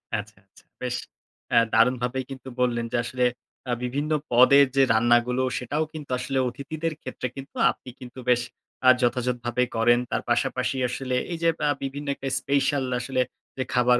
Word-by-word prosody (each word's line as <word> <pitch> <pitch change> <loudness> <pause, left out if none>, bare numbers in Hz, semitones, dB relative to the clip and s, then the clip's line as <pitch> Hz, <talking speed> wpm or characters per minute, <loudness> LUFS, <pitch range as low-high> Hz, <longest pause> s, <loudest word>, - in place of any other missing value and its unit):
আচ্ছা, 105 0 -6
আচ্ছা। 95 - -22 0.2
বেশ 125 -1 -2 0.6
অ্যা - - +6
দারুণভাবেই 125 +2 +2
কিন্তু 130 -1 -8
বললেন 120 -2 +1
যে - - +1
আসলে 125 +1 -2 0.5
আ - - +1
বিভিন্ন 140 +5 -2 0.2
পদের 130 +4 +7
যে 135 - +6
রান্নাগুলো 120 +2 +3
সেটাও 145 +5 -1
কিন্তু 150 -4 -8
আসলে 135 +1 -2
অতিথিদের 155 +5 -4
ক্ষেত্রে 130 -1 -4
কিন্তু 135 0 -10 0.2
আপনি - - -12
কিন্তু 125 +1 -10
বেশ 120 -1 +4 0.5
আ - - +10
যথাযথভাবেই 125 0 0
করেন। 120 +1 +4
তার - - 0
পাশাপাশি 125 +2 0
আসলে 130 0 -3 0.2
এই 170 - -2
যে 165 - +5 0.2
আ - - +3
বিভিন্ন 140 +2 -5
একটা 135 - -6
স্পেশাল 140 0 +1 0.2
আসলে 130 0 -1 0.4
যে 130 - 0
খাবার 125 0 +4
125 Hz, 165 wpm, -25 LUFS, 120-135 Hz, 0.6 s, আ